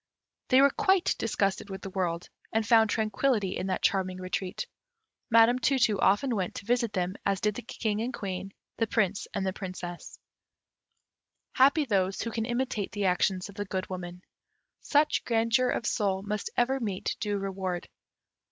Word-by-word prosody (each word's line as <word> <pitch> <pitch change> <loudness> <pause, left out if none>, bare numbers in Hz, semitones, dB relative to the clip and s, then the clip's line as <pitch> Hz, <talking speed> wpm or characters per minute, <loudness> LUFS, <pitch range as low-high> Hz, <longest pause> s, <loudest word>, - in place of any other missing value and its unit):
They 260 0 +6
were 280 0 +6
quite 380 0 +2
disgusted 200 -2 0
with 190 -1 -7
the 195 - -6
world, 175 -2 -2 0.2
and 220 0 +1
found 225 -1 +5
tranquillity 215 -1 +1
in 185 - -3
that 190 - -2
charming 185 -2 +1
retreat. 185 +3 -3 0.6
Madam 230 +2 +6
Tu 270 +2 +2
tu 215 -5 +2
often 235 +5 +3
went 185 -4 -2
to 200 - -7
visit 235 -1 +1
them, 185 -1 -1
as 195 -1 +1
did 210 0 +1
the 245 - -6
King 220 -2 -2
and 240 +3 -2
Queen, 190 -2 -5 0.3
the 225 - +1
Prince 200 -2 0
and 195 - -1
Princess. 180 -3 -7 1.4
Happy 280 +4 +4
those 195 -5 +1
who 230 - -3
can 225 0 -2
imitate 240 -4 -2
the 205 -1 -1
actions 185 0 +1
of 200 - -11
the 205 +1 -4
Good 190 -1 -3
Woman. 180 0 -6 0.6
Such 295 +1 +2
grandeur 235 +2 +2
of 235 - -1
soul 195 -4 0
must 210 0 -3
ever 260 +3 +2
meet 200 -6 -2
due 205 -1 -1
reward. 190 -2 -3
205 Hz, 170 wpm, -28 LUFS, 190-235 Hz, 1.4 s, They